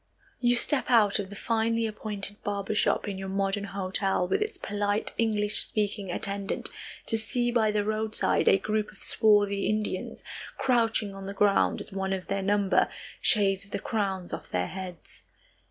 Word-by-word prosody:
You 245 Hz, -1 st, +3 dB
step 270 Hz, +3 st, +2 dB
out 215 Hz, -5 st, +5 dB
of 195 Hz, -2 st, -4 dB
the 205 Hz, -, -9 dB
finely 230 Hz, +1 st, 0 dB
appointed 210 Hz, -2 st, -5 dB
barber 200 Hz, 0 st, -2 dB
shop 215 Hz, -, +1 dB
in 195 Hz, -2 st, -4 dB
your 190 Hz, 0 st, -5 dB
modern 195 Hz, +1 st, 0 dB
hotel, 190 Hz, -1 st, -1 dB
with 400 Hz, -, +1 dB
its 435 Hz, +1 st, -2 dB
polite, 205 Hz, +1 st, -1 dB
English 210 Hz, -2 st, +2 dB
speaking 205 Hz, -2 st, -2 dB
attendant, 200 Hz, +1 st, -2 dB, 0.4 s
to 225 Hz, -, +1 dB
see 240 Hz, +2 st, 0 dB
by 225 Hz, -3 st, +3 dB
the 210 Hz, -1 st, +1 dB
roadside 215 Hz, +1 st, 0 dB
a -, -, +7 dB
group 215 Hz, +2 st, -1 dB
of 205 Hz, -, -10 dB
swarthy 205 Hz, -2 st, +3 dB
Indians, 215 Hz, -3 st, -2 dB, 0.3 s
crouching 225 Hz, -5 st, +1 dB
on 195 Hz, 0 st, -8 dB
the 200 Hz, -, -6 dB
ground, 200 Hz, 0 st, +3 dB
as -, -, -10 dB
one 190 Hz, 0 st, -2 dB
of 185 Hz, -1 st, -3 dB
their 195 Hz, 0 st, -1 dB
number 200 Hz, 0 st, +2 dB, 0.3 s
shaves 195 Hz, -2 st, +3 dB
the 200 Hz, -, -2 dB
crowns 195 Hz, -4 st, -2 dB
of -, -, -6 dB
their 90 Hz, 0 st, -1 dB
heads. 185 Hz, -2 st, -8 dB
205 Hz, 170 wpm, -28 LUFS, 195-215 Hz, 0.4 s, a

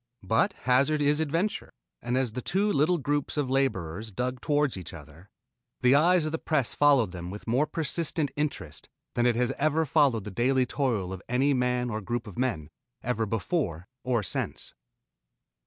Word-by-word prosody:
But 110 Hz, +4 st, +2 dB
hazard 135 Hz, +5 st, +3 dB
is 145 Hz, +1 st, +2 dB
adventure, 165 Hz, +7 st, -1 dB, 0.3 s
and 120 Hz, +1 st, -1 dB
as 130 Hz, -3 st, 0 dB
the 125 Hz, -, -4 dB
two 200 Hz, +7 st, +1 dB
little 155 Hz, +5 st, +3 dB
groups 145 Hz, 0 st, -1 dB
of 140 Hz, -3 st, 0 dB
laborers 110 Hz, -7 st, -1 dB
dug 125 Hz, +4 st, -3 dB
toward 145 Hz, -2 st, +1 dB
each 90 Hz, -3 st, -7 dB
other, 80 Hz, +4 st, -14 dB, 0.5 s
the 125 Hz, +1 st, +5 dB
eyes 165 Hz, +3 st, +4 dB
of 155 Hz, -, -2 dB
the 160 Hz, -, -2 dB
press 145 Hz, -7 st, 0 dB
followed 140 Hz, -9 st, +4 dB
them 90 Hz, -1 st, -6 dB
with 105 Hz, +3 st, -8 dB
more 130 Hz, +6 st, +2 dB
persistent 160 Hz, -1 st, -1 dB
interest 130 Hz, -, -4 dB, 0.2 s
than 120 Hz, 0 st, +2 dB
it 120 Hz, -, +2 dB
has 120 Hz, 0 st, +1 dB
ever 155 Hz, +2 st, +2 dB
followed 135 Hz, -7 st, +3 dB
the 105 Hz, -, -7 dB
daily 130 Hz, +5 st, +2 dB
toil 120 Hz, -9 st, -1 dB
of 95 Hz, -, -7 dB
any 135 Hz, +4 st, +2 dB
man 125 Hz, -1 st, 0 dB
or 110 Hz, 0 st, -3 dB
group 120 Hz, +4 st, -3 dB
of 105 Hz, -, -10 dB
men, 115 Hz, -, -1 dB, 0.3 s
either 115 Hz, -2 st, -1 dB
before 100 Hz, -, -2 dB, 0.2 s
or 120 Hz, -4 st, 0 dB
since. 90 Hz, -, -3 dB
125 Hz, 175 wpm, -28 LUFS, 110-145 Hz, 0.5 s, the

